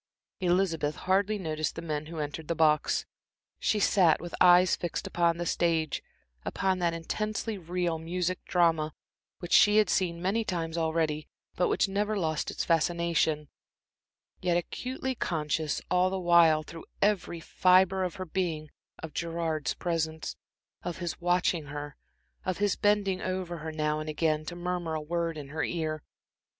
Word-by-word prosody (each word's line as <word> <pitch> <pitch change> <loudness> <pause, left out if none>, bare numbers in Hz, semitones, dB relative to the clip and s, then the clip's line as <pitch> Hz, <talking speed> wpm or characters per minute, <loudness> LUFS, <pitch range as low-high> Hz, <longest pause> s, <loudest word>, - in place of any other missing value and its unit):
Elizabeth 175 -5 +1
hardly 200 +3 +1
noticed 155 -4 -2
the 165 - -5
men 155 -2 -3
who 165 0 -8
entered 150 +1 -4
the 170 - -1
box. 155 -2 +2 0.5
She 215 - +1
sat 180 -5 +4
with 175 -1 -8
eyes 180 0 +7
fixed 175 - -4
upon 170 -1 +1
the 175 - -3
stage, 165 -2 0 0.4
upon 190 -1 0
that 170 -1 +1
intensely 215 +5 -3
real 175 -1 -2
music 180 +2 -2
drama 165 -3 +2 0.4
which 175 - -8
she 210 0 +7
had 215 -1 +4
seen 170 -3 0
many 195 +6 0
times 165 -5 -3
already, 160 -2 0 0.3
but 180 - +2
which - - +2
never 205 +2 -1
lost 160 -5 -1
its - - -3
fascination; 165 -2 +1 0.9
yet 175 -1 +2
acutely 260 +8 -3
conscious 155 - -1
all 180 0 +4
the 190 0 -2
while 170 -3 +5
through 165 +1 -10 0.2
every 195 -4 +1
fibre 185 +3 +3
of 180 - -3
her 185 - -5
being 160 -4 -2 0.3
of 160 -2 -6
Gerard's 165 -4 -2
presence, 160 -2 -2 0.5
of 175 - -4
his 175 -1 -4
watching 175 -2 +1
her, 145 0 -6 0.5
of 185 -1 -2
his 205 -1 +1
bending 205 -3 +1
over 185 -2 -3
her, 160 +1 -5
now 150 -1 -1
and 155 0 -5
again, 155 0 0
to 175 - -6
murmur 175 -2 -2
a - - -1
word 165 +1 -2
in 140 -2 -7
her 160 +2 -2
ear. 155 -3 -2
170 Hz, 160 wpm, -29 LUFS, 160-185 Hz, 0.9 s, eyes